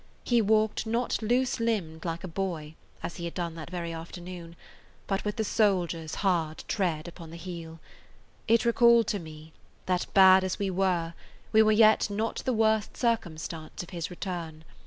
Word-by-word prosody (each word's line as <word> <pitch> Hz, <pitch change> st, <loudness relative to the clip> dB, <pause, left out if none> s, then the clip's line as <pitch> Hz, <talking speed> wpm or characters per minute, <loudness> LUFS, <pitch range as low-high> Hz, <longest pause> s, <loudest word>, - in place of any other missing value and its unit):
He 240 Hz, -2 st, +3 dB
walked 220 Hz, +1 st, +2 dB
not 235 Hz, +2 st, 0 dB
loose 245 Hz, +3 st, +1 dB
limbed 185 Hz, -9 st, -2 dB
like 165 Hz, 0 st, -3 dB
a -, -, -4 dB
boy, 165 Hz, -4 st, -4 dB, 0.3 s
as 170 Hz, -, -5 dB
he 170 Hz, -, -5 dB
had 170 Hz, -, -6 dB
done 170 Hz, -2 st, -3 dB
that 160 Hz, -1 st, -8 dB
very 170 Hz, -2 st, -4 dB
afternoon, 170 Hz, +1 st, -8 dB, 0.5 s
but 195 Hz, -1 st, -1 dB
with 210 Hz, 0 st, -2 dB
the 220 Hz, -, -1 dB
soldier's 180 Hz, -7 st, 0 dB
hard 165 Hz, -4 st, 0 dB
tread 175 Hz, -5 st, -1 dB
upon 170 Hz, -1 st, -10 dB
the 165 Hz, -, -9 dB
heel. 165 Hz, -2 st, -8 dB, 0.7 s
It 230 Hz, +1 st, +4 dB
recalled 235 Hz, 0 st, +5 dB
to 205 Hz, -, -1 dB
me 155 Hz, -1 st, -11 dB, 0.3 s
that, 180 Hz, -1 st, 0 dB
bad 190 Hz, -1 st, +8 dB
as 185 Hz, -1 st, -2 dB
we 195 Hz, -1 st, -1 dB
were, 180 Hz, -3 st, 0 dB, 0.4 s
we 220 Hz, -, +6 dB
were 215 Hz, 0 st, +5 dB
yet 215 Hz, 0 st, +5 dB
not 215 Hz, +3 st, -2 dB
the 260 Hz, -, +1 dB
worst 220 Hz, -1 st, +1 dB
circumstance 170 Hz, -9 st, -2 dB
of 175 Hz, -, -13 dB
his 175 Hz, 0 st, -4 dB
return. 170 Hz, -4 st, -6 dB
185 Hz, 175 wpm, -28 LUFS, 165-215 Hz, 0.7 s, bad